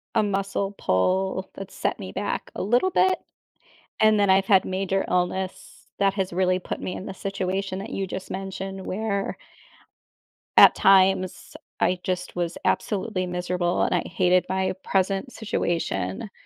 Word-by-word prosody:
a 220 - +4
muscle 195 0 -1
pull 190 - 0
that 195 -1 -8
set - - -2
me - - -7
back - - -3
a - - -3
little 245 - +3
bit, 375 +1 +3 0.8
and 215 -1 +5
then 200 - +3
I've 190 0 +5
had 190 -2 +5
major 195 +1 0
illness 180 +1 -2
that 195 -1 +3
has 190 -2 -1
really 185 +1 +1
put 185 - -5
me 180 - -4
in 190 - -7
the 195 - -6
situation 195 0 -3
that 195 - -6
you 195 -1 -2
just 185 +1 -6
mentioned, 195 0 -5
where 200 0 -2 1.2
at - - +10
times, 190 -2 +3 0.2
I 180 0 +2
just 180 -1 -3
was 175 -1 -2
absolutely 195 -3 0
miserable, 180 0 -1
and - - +1
I 175 - +2
hated 180 0 +3
my 190 0 0
present 195 +6 0
situation, 170 - -2
190 Hz, 155 wpm, -25 LUFS, 185-195 Hz, 1.2 s, at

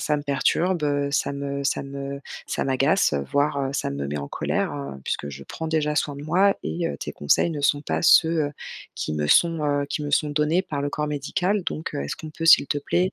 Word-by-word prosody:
ça 150 - +1
me 145 - -4
perturbe, 165 +5 +1
heu, 145 -1 0
ça 140 - 0
me 140 0 -4
ça 135 - 0
me 140 0 -6 0.3
ça - - -2
m'agace, 135 - +2 0.2
voire, 145 0 +1
heu, 135 -1 -1
ça - - -1
me 70 0 -3
met 75 - -3
en 70 - -5
colère, - - -1
heu, 70 -1 -6
puisque - - -1
je 70 -1 -8
prends 160 - -6
déjà 155 -1 0
soin 145 -1 0
de 140 - -8
moi 185 +6 +3
et 80 +1 -2
heu, 70 - -5
tes - - -6
conseils 75 - +2
ne 150 -3 -4
sont 145 0 +2
pas - - -1
ceux, 165 -2 +5
heu, - - -4 0.4
qui - - -3
me 75 -1 -1
sont, 165 - +4
heu, 145 -1 +1
qui 150 - -3
me 145 - -3
sont 150 +1 +2
donnés 150 +5 +2
par 145 -6 -4
le 145 - -1
corps 150 +1 -2
médical. 180 +7 -1
Donc 160 - -4
heu, - - -2
est-ce 70 - -4
qu'on 155 - -8
peut, 165 +2 -4
s'il 165 - +7
te 145 - -1
plaît, 180 +6 0
145 Hz, 245 wpm, -24 LUFS, 140-160 Hz, 0.4 s, s'il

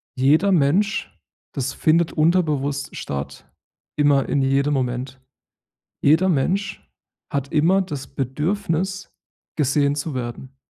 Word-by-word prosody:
jeder 155 +9 +3
Mensch 180 +7 +1 0.4
das 135 -1 -2
findet 165 +1 +2
unterbewusst 155 -4 0
statt, 70 0 -6 0.4
immer 145 -2 +2
in 140 - +1
jedem 140 +2 +1
Moment. 130 0 -3 0.8
Jeder 160 +6 +4
Mensch 185 +6 0 0.5
hat 140 0 -3
immer 170 +6 +3
das 145 -8 -6
Bedürfnis, 170 - -2 0.4
gesehen 140 -1 +2
zu 150 +2 -4
werden 130 +2 -6
145 Hz, 105 wpm, -22 LUFS, 135-170 Hz, 0.8 s, Jeder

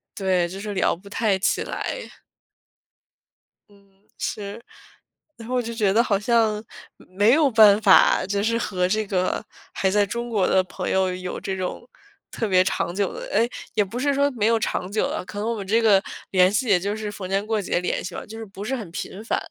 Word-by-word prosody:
对， 185 -3 +1
就 190 +2 -7
是 205 0 -5
聊 190 - +1
不 185 +4 -17
太 205 -1 0
起 190 - +1
来。 - - -5 1.6
嗯， 200 -1 -23 0.3
是。 205 +2 -5 0.7
然 230 0 -10
后 255 - -1
我 250 - +2
就 230 0 -5
觉 210 -4 +1
得 220 +4 +4
好 205 -4 +1
像 220 -1 +1 0.3
没 205 +5 +1
有 300 -1 +4
办 215 -2 +6
法， 195 -3 +5
就 200 +1 -1
是 230 +2 +1
和 185 -6 -1
这 215 +3 0
个 185 -2 -1 0.3
还 190 - +1
在 205 +1 +3
中 235 +4 -4
国 205 -5 +1
的 190 - +3
朋 - - -5
友 190 -1 +1
有 180 0 -5
这 190 -1 -3
种 185 +6 -5 0.4
特 225 - -2
别 185 -2 +4
长 175 -1 -2
久 200 -1 0
的 - - -7
哎， 225 +3 +3 0.3
也 210 - +3
不 205 +5 -6
是 285 +2 +1
说 280 +1 +2
没 225 -5 -1
有 230 0 +3
长 185 -3 -2
久 215 - 0
的， - - -4
可 205 - -9
能 215 +2 -2
我 235 - -1
们 195 -2 -6
这 225 +4 +3
个 205 -4 +5 0.3
联 185 -1 +5
系 230 +4 0
也 195 -4 +4
就 200 +3 -2
是 215 -1 -5
逢 200 -2 -7
年 195 +2 -1
过 215 -1 0
节 180 - -1
联 180 - -2
系 - - -6
了， - - -6
就 220 +1 -9
是 225 - -6
不 200 -1 -9
是 255 +5 -2
很 220 -8 -7
频 195 +3 -6
繁。 - - 0
205 Hz, 235 characters per minute, -23 LUFS, 190-225 Hz, 1.6 s, 办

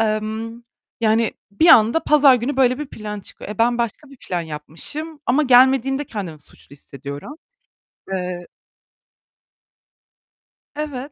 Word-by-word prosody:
emm, 220 +2 -2 0.4
yani 225 0 +2 0.2
bir 315 +12 +3
anda 230 +4 +6
pazar 290 -3 +6
günü 250 +3 -2
böyle 255 0 +3
bir 300 - -4
plan 210 -4 -7
çıkıyor. 195 - -11
E, 210 - -7
ben 240 +1 +2
başka 235 +5 -3
bir 275 - -14
plan 180 -7 -4
yapmışım 170 - -7
ama 270 +5 +3
gelmediğimde 265 +1 +4
kendimi 180 - -7
suçlu - - -15
hissediyorum. 140 - -9 0.8
Eee 180 -2 -4 2.3
Evet 290 -2 -5
230 Hz, 125 wpm, -21 LUFS, 200-270 Hz, 2.3 s, anda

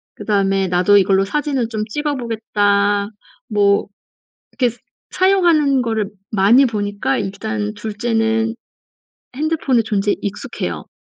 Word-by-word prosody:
그다음에 195 -2 0
"나도 180 +3 +4
이걸로 195 0 +3
사진을 275 0 -1
좀 215 -2 -3
찍어 295 +5 -2
보겠다." 205 -4 0 0.4
뭐 205 -2 +2 0.7
이렇게 245 -2 +1 0.3
사용하는 340 -8 +3
거를 220 -3 -2 0.2
많이 220 +7 +5
보니까 205 - -2
일단 210 +1 -3
2 210 0 -6
째는 225 -1 0 0.8
핸드폰의 285 -6 +1
존재에 205 -1 0
익숙해요. 200 0 -5
215 Hz, 260 characters per minute, -18 LUFS, 200-245 Hz, 0.8 s, 많이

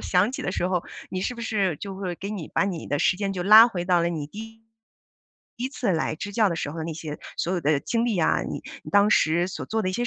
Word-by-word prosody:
响 190 +6 +2
起 - - -4
的 - - -2
时 180 -2 -1
候， 180 -2 0 0.3
你 185 - -3
是 245 - -2
不 235 - -7
是 195 -7 0
就 195 +5 -7
会 190 -2 -4
给 195 +4 -6
你 190 -7 -5
把 - - +1
你 185 -4 -4
的 145 - -1
时 180 - +2
间 195 -1 -2
就 180 - -2
拉 215 +4 +9
回 175 -6 -4
到 175 -1 +3
了 170 - +1
你 160 -4 -4
第 200 - -12
1 225 0 -11 1.0
第 245 - -3
1 260 - 0
次 240 -7 -1
来 160 -1 0
支 205 +6 -6
教 215 -2 +3
的 170 - -2
时 145 - -3
候 165 - -7
的 160 - -3
那 165 -1 -4
些 155 -1 -6 0.2
所 175 - -1
有 180 - 0
的 150 -2 +2
经 235 - 0
历 220 -5 0
啊， 160 - +2
你 - - -5 0.2
你 - - -9
当 205 +1 +5
时 170 0 +3
所 190 - -6
做 220 0 -1
的 185 - 0
一 - - -5
些 240 +4 -1
185 Hz, 305 characters per minute, -25 LUFS, 170-215 Hz, 1.0 s, 拉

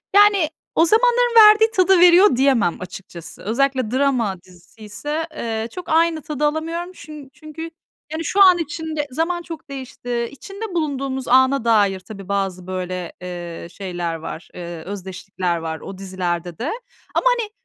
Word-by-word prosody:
yani 405 -6 +5 0.3
o 325 - +5
zamanların 485 +4 +3
verdiği 440 +1 +4
tadı 375 -3 +4
veriyor 355 -2 +7
diyemem 255 -9 +3
açıkçası. 175 -2 -10
Özellikle 255 +1 0
drama 250 -8 0
diziyse, 215 - -7
eee, 225 -1 -3
çok 360 - -8
aynı 325 0 +2
tadı 300 +1 -2
alamıyorum. 330 +4 -2
Çün 305 -6 -11
çünkü 310 +1 -10 0.5
yani 320 +1 -4
şu 400 +6 +5
an 365 -2 +7
için 320 -1 -4
de 295 -1 -2
zaman 330 +5 -1
çok 330 -3 -9
değişti. 245 -3 -4
İçinde 390 +10 -8
bulunduğumuz 275 -5 -2
ana 260 +1 +4
dair 205 -4 +3
tabii 195 0 -11
bazı 190 -2 -2
böyle, 185 -1 -4
eee, 175 -2 -7
şeyler 175 -4 -4
var, 160 +1 -8
eee, 175 -1 -7
özdeşlikler 185 -2 -4
var 160 -1 -5
o 195 - -9
dizilerde 180 -3 -4
de. 255 +7 -3 0.4
Ama - - +1
hani 450 -3 -3
260 Hz, 150 wpm, -21 LUFS, -, 0.5 s, veriyor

